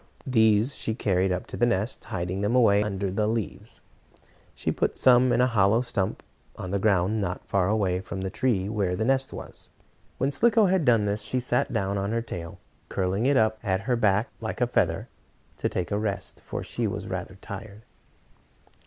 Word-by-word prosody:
These 110 0 +3
she 110 - -3
carried 95 -3 +1
up 90 0 -2
to - - -8
the 120 - +3
nest, 110 0 -1
hiding 90 +1 -3
them 105 +4 +1
away 105 -5 +5
under 100 -2 -2
the 105 +2 0
leaves. 110 -2 -4 0.3
Some - - -28 0.3
she - - -1
put - - -2
in 125 -1 +6
a - - +5
hollow 110 -2 +3
stump, 95 -6 -2 0.3
on 90 - -5
the 100 - 0
ground 100 +1 +2
not 90 -2 -3
far 95 -2 +1
away 100 -4 +1
from 95 0 -6
the 95 0 -3
tree 110 -4 0
where 100 -4 -1
the 110 - -1
nest 135 +1 +1
was. - - -9 0.5
When 135 +2 0
Slicko 225 - +4
had 185 -4 +2
done 115 -4 +4
this, 105 +1 -1
she 130 - -2
sat 125 0 0
down 100 0 -1
on 100 +3 -2
her 115 - 0
tail, 85 -4 -7 0.3
curling 95 +5 0
it 140 -1 +4
up 110 -1 +2
at 95 -4 0
her 125 +5 0
back 105 -1 +2
like - - -4
a - - +3
feather, - - 0 0.5
to - - -1
take 90 0 -3
a 100 - +1
rest, 100 -3 -4
for - - -5
she - - -2
was - - -4
rather 95 - -5
tired. 100 +2 -9
105 Hz, 195 wpm, -26 LUFS, 95-120 Hz, 0.5 s, in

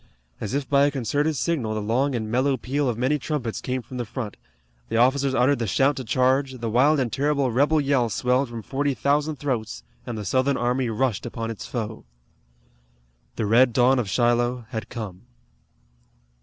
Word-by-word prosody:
As 105 +4 -3
if 140 -2 -2
by 140 0 +4
a - - +2
concerted 145 +4 -1
signal 130 -7 -1
the - - -1
long 125 +6 0
and 110 -2 -2
mellow 130 +3 +2
peal 135 +3 -1
of 115 - -2
many 130 +5 +1
trumpets 125 -5 -3
came 130 -1 -3
from 125 +3 -9
the 120 - -1
front, 115 -1 -6 0.5
the - - 0
officers 130 +2 +3
uttered 130 +2 +3
the 115 - -1
shout 135 +8 +2
to 130 - -4
charge, 130 +3 +1
the 115 -3 -4
wild 140 +6 +4
and 125 -4 -1
terrible 140 -2 +1
rebel 145 +6 +3
yell 135 -4 +1
swelled 125 +4 +1
from 115 -2 -7
forty 140 +2 -1
thousand 150 +3 +1
throats, 125 -6 -3 0.2
and 120 -2 -4
the 105 - -5
Southern 130 +6 +1
army 125 +1 0
rushed 120 0 -1
upon 115 -1 -4
its 110 - -7
foe. 110 -3 -5 1.3
The - - -1
red 120 +3 +4
dawn 125 +2 +4
of 110 -5 -2
Shiloh 120 +2 +1
had 110 -3 -5
come. 100 -6 -7
125 Hz, 185 wpm, -24 LUFS, 115-140 Hz, 1.3 s, by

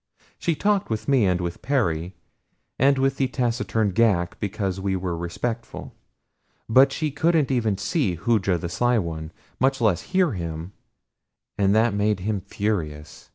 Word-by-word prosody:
She 170 - 0
talked 205 +4 +1
with 110 -1 -3
me, 130 -7 +4
and 90 -1 +1
with 85 -1 -4
Perry, 90 - -1 0.6
and 135 +1 +4
with 135 0 +1
the 135 - +1
taciturn 115 -5 0
Ghak 95 -5 +1
because 100 -2 -2
we 95 0 0
were 90 -2 -2
respectful; 110 +8 -5 0.7
but 130 +4 +5
she 155 +1 -2
couldn't 155 -1 +2
even 110 -6 +1
see 100 - 0
Hooja 95 0 +1
the 85 +1 -4
Sly 120 +8 +1
One, 80 -5 -4 0.3
much 135 +1 +2
less 105 -7 +2
hear 185 -4 +2
him, 85 -2 -5 0.8
and 100 0 +2
that 110 0 +3
made 105 -1 0
him 105 0 -1
furious. 85 -7 -4
105 Hz, 155 wpm, -24 LUFS, 90-130 Hz, 0.8 s, but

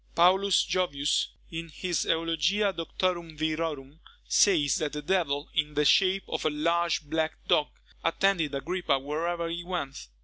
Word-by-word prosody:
Paulus 190 +2 +4
Jovius, 145 -6 0 0.2
in 165 0 -5
his 175 +2 -2
Eulogia 165 +5 +1
Doctorum 170 -1 -2
Virorum, 155 -2 -3 0.3
says, 165 -6 +4
that 155 -5 -2
the 150 - -4
devil, 155 -4 0
in 150 -2 0
the 150 0 +2
shape 190 +5 +4
of - - -3
a 155 - +2
large 170 +3 0
black 160 +1 -1
dog, 150 - +3 0.4
attended 165 -4 +1
Agrippa 175 0 0
wherever 165 +5 -2
he 170 +1 -4
went. 145 - -5
165 Hz, 140 wpm, -28 LUFS, 150-180 Hz, 0.4 s, Paulus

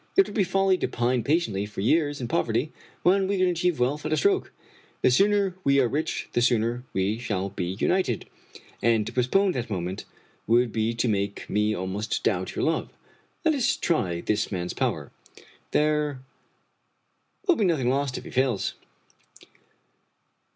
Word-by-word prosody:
It 390 - +7
would - - -9
be 205 - +2
folly 190 0 +2
to - - 0
pine 120 0 0
patiently 115 - 0
for 105 - -6
years 145 +5 +2
in 125 - -3
poverty, 120 +6 0 0.3
when 190 +2 +4
we 200 0 0
can 185 - +3
achieve 175 -3 0
wealth 135 +5 0
at 155 - -3
a 155 - +2
stroke. 400 -1 +1 0.5
The - - +5
sooner 200 +5 +3
we 140 0 +4
are 130 - +4
rich 150 +6 -2
the 120 - +2
sooner 120 0 +1
we 100 +4 0
shall 100 -5 -2
be 90 -1 -4
united, 175 - +1 0.6
and 115 -2 +3
to - - -6
postpone 185 +11 +2
that 125 -6 -4
moment 90 -1 -4 0.4
would 120 +1 +3
be 110 +1 0
to 120 +2 0
make 100 -2 -2
me 105 +1 +1
almost 95 +4 -3
doubt 95 -3 -1
your - - 0
love. 160 0 0 0.6
Let 320 - +4
us 275 -1 +1
try 90 - 0
this 105 +3 -1
man's 90 -2 -3
power. - - -2 0.6
There 150 -3 +1 1.2
will 360 -4 +4
be - - +1
nothing 150 -9 +1
lost 135 -1 -1
if - - -7
he - - -10
fails." 125 -6 0
125 Hz, 170 wpm, -26 LUFS, 110-170 Hz, 1.2 s, It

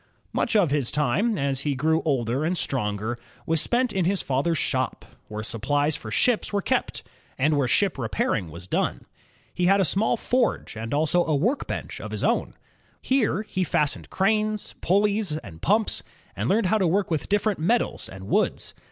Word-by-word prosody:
'' - - -39
Much - - 0
of 185 -9 +4
his 140 -4 +2
time, 150 - +1
as 135 -2 -1
he 140 0 -1
grew 160 +4 +2
older 130 -2 0
and 175 +3 0
stronger, 110 -3 -2 0.3
was 165 -1 +2
spent 245 0 +1
in 190 - +1
his 195 +2 +2
father's 140 +5 0
shop, 130 -2 -1 0.2
where 105 0 -5
supplies 145 +7 0
for 110 - -7
ships 235 - +1
were 205 - +1
kept, 195 - -1 0.3
and 150 +3 +2
where 140 -3 +2
ship 195 +1 +1
repairing 100 -5 -1
was 85 +3 -10
done. - - -1 0.5
He 180 - +1
had 195 +1 +5
a 190 - +3
small 195 +8 +2
forge 245 - 0
and 115 +1 -5
also 155 +4 +2
a 155 - +1
workbench 225 - -2
of - - -6
his - - -4
own. - - 0 0.4
Here 230 -6 +1
he 190 -3 -2
fash 150 -4 +1
ioned - - -11
cranes, 215 +2 0
pulleys, 200 -3 +1
and 80 - -10
pumps, 215 +3 +1 0.3
and - - -2
learned 205 0 +3
to 210 -3 +3
work 190 +2 +1
with 155 - -1
different 205 -1 +1
metals 230 +10 0
and 95 0 -10
woods. - - 0
160 Hz, 185 wpm, -25 LUFS, 130-205 Hz, 0.5 s, had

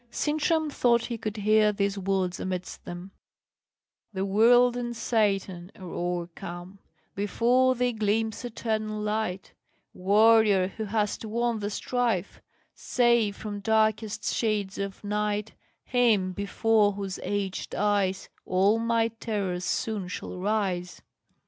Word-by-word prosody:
Sintram 310 +3 0
thought 235 -3 +2
he 235 - -4
could 215 -1 -4
hear 215 +1 +4
these 200 -1 -1
words 190 -2 -1
amidst 185 -1 -5
them: 175 +2 -8 1.0
"The 190 -1 -2
world 240 +5 +5
and 240 -1 -3
Satan 200 -5 0
are 190 - -13
o'ercome, 175 +1 -5 0.3
Before 240 +6 +2
thee 245 0 0
gleams 220 +1 -1
eternal 220 -2 -3
light, 210 -3 -3 0.4
Warrior, 205 0 +4
who 220 +2 -5
hast 210 +1 -1
won 230 +1 -1
the 205 0 -3
strife: 225 -3 -1 0.3
Save 235 -4 +2
from 205 -1 -6
darkest 220 0 +1
shades 210 -4 -1
of 200 0 -5
night 210 +1 -2 0.3
Him 225 -7 +2
before 205 +1 +2
whose 195 -1 -5
aged 200 -2 -3
eyes 200 -2 0 0.2
All 195 +4 +2
my 230 0 +1
terrors 200 -6 -3
soon 205 +1 -2
shall 180 - -6
rise." 185 -3 -2
210 Hz, 120 wpm, -27 LUFS, 195-225 Hz, 1.0 s, world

